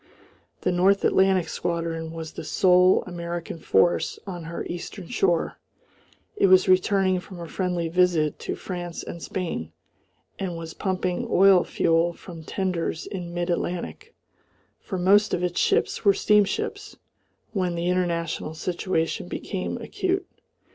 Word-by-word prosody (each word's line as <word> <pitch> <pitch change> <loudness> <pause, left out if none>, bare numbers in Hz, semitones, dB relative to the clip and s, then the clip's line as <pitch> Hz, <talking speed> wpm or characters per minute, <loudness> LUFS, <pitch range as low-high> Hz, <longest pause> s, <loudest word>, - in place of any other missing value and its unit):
The 180 - +1
North 190 +3 +3
Atlantic 190 -3 +3
squadron 165 -1 -3
was 160 -1 -7
the - - -7
sole 180 +3 +4
American 170 -1 -5
force 85 - +2
on 175 -4 -6
her 170 +1 -5
eastern 175 +1 -6
shore, 175 -3 +1 0.8
it 405 - +4
was 185 0 +6
returning 185 0 +3
from 180 0 -11
a 170 - -6
friendly 180 -1 -1
visit 170 -3 +2
to - - -4
France 175 -2 -6
and 170 - -8
Spain, 165 - -4 0.7
and 180 -3 -3
was 165 -1 -7
pumping 185 -2 -2
oil 190 -1 +6
fuel 165 +1 +1
from 165 -2 -11
tenders 175 -2 -2
in 175 -3 -6
mid 175 +1 -2
Atlantic 180 - -4 0.6
for 190 - -5
most 200 +4 +4
of 180 - -3
its 175 -1 -1
ships - - +1
were 200 -1 +5
steamships 210 - +1 0.6
when 180 -4 0
the 170 +1 -2
international 170 -3 -1
situation 170 -1 -2
became - - -4
acute. 380 0 -2
180 Hz, 135 wpm, -25 LUFS, 170-190 Hz, 0.8 s, was